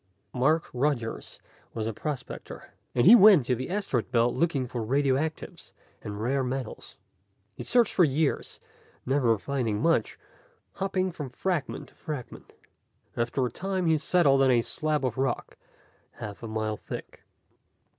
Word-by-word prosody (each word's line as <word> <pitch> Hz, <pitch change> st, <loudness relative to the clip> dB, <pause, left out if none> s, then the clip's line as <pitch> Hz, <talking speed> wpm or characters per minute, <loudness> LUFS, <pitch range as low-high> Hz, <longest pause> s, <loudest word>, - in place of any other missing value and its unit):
_ -, -, -4 dB
Mark 155 Hz, +5 st, +2 dB
Rogers 125 Hz, -3 st, -2 dB, 0.4 s
was 110 Hz, -1 st, -2 dB
a 115 Hz, -, -2 dB
prospector, 145 Hz, +2 st, -7 dB, 0.2 s
and 120 Hz, 0 st, +3 dB
he 220 Hz, -, +10 dB
went 200 Hz, -, +8 dB
to 125 Hz, -, +1 dB
the 130 Hz, +2 st, -4 dB
asteroid 185 Hz, -, -1 dB
belt 120 Hz, -1 st, +2 dB
looking 160 Hz, -6 st, 0 dB
for 120 Hz, -1 st, -5 dB
radioactives 140 Hz, +5 st, -1 dB, 0.3 s
and 105 Hz, -1 st, -6 dB
rare 130 Hz, +5 st, 0 dB
metals. 130 Hz, -2 st, -5 dB, 0.6 s
He -, -, -9 dB
searched 240 Hz, -3 st, +2 dB
for 180 Hz, -, +4 dB
years, 150 Hz, 0 st, 0 dB, 0.5 s
never 125 Hz, -4 st, +2 dB
finding 115 Hz, -3 st, -2 dB
much, 165 Hz, +2 st, +1 dB, 0.6 s
hopping 190 Hz, -1 st, -1 dB
from 150 Hz, -5 st, -6 dB
fragment 170 Hz, +1 st, -3 dB
to -, -, -25 dB
fragment. 145 Hz, -6 st, -8 dB, 0.6 s
After 120 Hz, +3 st, 0 dB
a 120 Hz, -, -3 dB
time 190 Hz, +4 st, -2 dB
he 160 Hz, -2 st, +3 dB
settled 150 Hz, -4 st, +3 dB
on 135 Hz, -, +4 dB
a 120 Hz, -2 st, +4 dB
slab 155 Hz, -1 st, -1 dB
of 125 Hz, 0 st, -2 dB
rock 135 Hz, -2 st, -2 dB, 0.6 s
half 105 Hz, -1 st, -8 dB
a 115 Hz, -, -6 dB
mile 110 Hz, -1 st, -2 dB
thick. -, -, -9 dB
135 Hz, 150 wpm, -27 LUFS, 120-160 Hz, 0.6 s, he